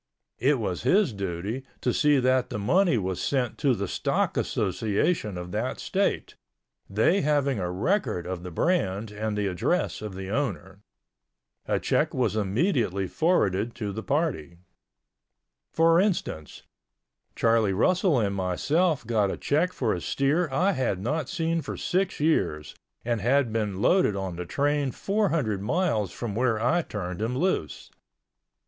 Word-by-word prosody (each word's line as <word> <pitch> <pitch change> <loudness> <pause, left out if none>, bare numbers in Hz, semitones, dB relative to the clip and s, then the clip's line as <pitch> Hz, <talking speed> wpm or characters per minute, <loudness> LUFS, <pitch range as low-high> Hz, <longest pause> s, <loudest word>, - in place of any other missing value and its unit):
It 140 +4 +3
was 95 -6 -3
his 180 - +3
duty 100 +5 -4 0.2
to 125 - +1
see 150 -1 +3
that 130 -1 +2
the - - -4
money 170 - +3
was 95 -3 -2
sent 125 +4 -1
to 135 -4 +2
the 100 -2 -3
stock - - 0
association 105 - 0
of 90 0 -6
that 110 +6 -2
state, 195 +1 -1 0.6
they 110 - +2
having 140 -4 +1
a 90 -2 -2
record 95 - -1
of 90 -1 -4
the 90 - -7
brand 105 - 0
and 105 0 -3
the 105 - 0
address 90 -3 -1
of 105 -3 -6
the 95 0 -6
owner. 100 -7 -3 0.9
A - - +1
check - - 0
was - - +1
immediately 105 - 0
forwarded 115 - +1
to 105 -4 -4
the 110 - -5
party. 135 - -2 1.1
For 165 +1 +4
instance, 175 - -2 0.7
Charlie 115 -3 +3
Russell 175 - +2
and 100 -3 0
myself 140 - 0
got 105 -3 +1
a - - -3
check 165 +6 +1
for 120 -10 -1
a 90 - -4
steer 145 - +1
I 180 +9 +2
had 125 - -1
not 145 +8 -2
seen 165 0 -1
for - - -6
six 190 +1 -1
years 90 - 0 0.3
and 120 -3 0
had 125 +1 +2
been 105 -3 -2
loaded 180 - +3
on 95 -3 -4
the 90 0 -6
train 145 +2 0
four 200 - 0
hundred 110 -12 -1
miles 110 - 0
from 115 -4 -5
where 115 0 +1
I 160 +10 +2
turned 95 - -5
him 120 +3 -1
loose. 140 - -2
115 Hz, 155 wpm, -26 LUFS, 100-155 Hz, 1.1 s, For